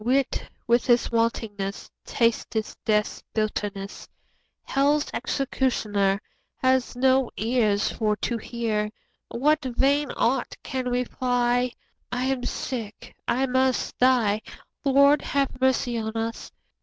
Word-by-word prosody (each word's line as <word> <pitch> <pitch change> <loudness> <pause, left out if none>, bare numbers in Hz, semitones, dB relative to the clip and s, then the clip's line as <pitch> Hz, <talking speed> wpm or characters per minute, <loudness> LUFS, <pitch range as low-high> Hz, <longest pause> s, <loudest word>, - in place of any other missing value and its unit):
Wit 260 +3 0 0.2
with 235 0 +2
his 240 -1 +3
wantonness 220 -4 -1
Tasteth 225 -1 0
death's 210 -2 +1
bitterness; 205 -2 -3 0.6
30 - - -9
Hell's 290 +2 +3
executioner 210 -8 0 0.4
Hath 260 -1 +1
no 260 0 +3
ears 220 -3 +1
for 215 -2 0
to 235 +2 -2
hear 220 -2 -2 0.4
What 300 +5 +1
vain 270 +3 +1
art 250 +2 0
can 255 -1 -3
reply; 245 0 +1 0.4
I 250 0 -1
am 260 -1 0
sick, 225 -5 -5
I 265 +2 +2
must 260 0 +1
die— 235 -5 +3 0.4
Lord, 280 +1 +5
have 275 -2 -1
mercy 255 -2 +2
on 220 0 -4
us! 225 +1 -4
245 Hz, 115 wpm, -25 LUFS, 220-260 Hz, 0.6 s, Lord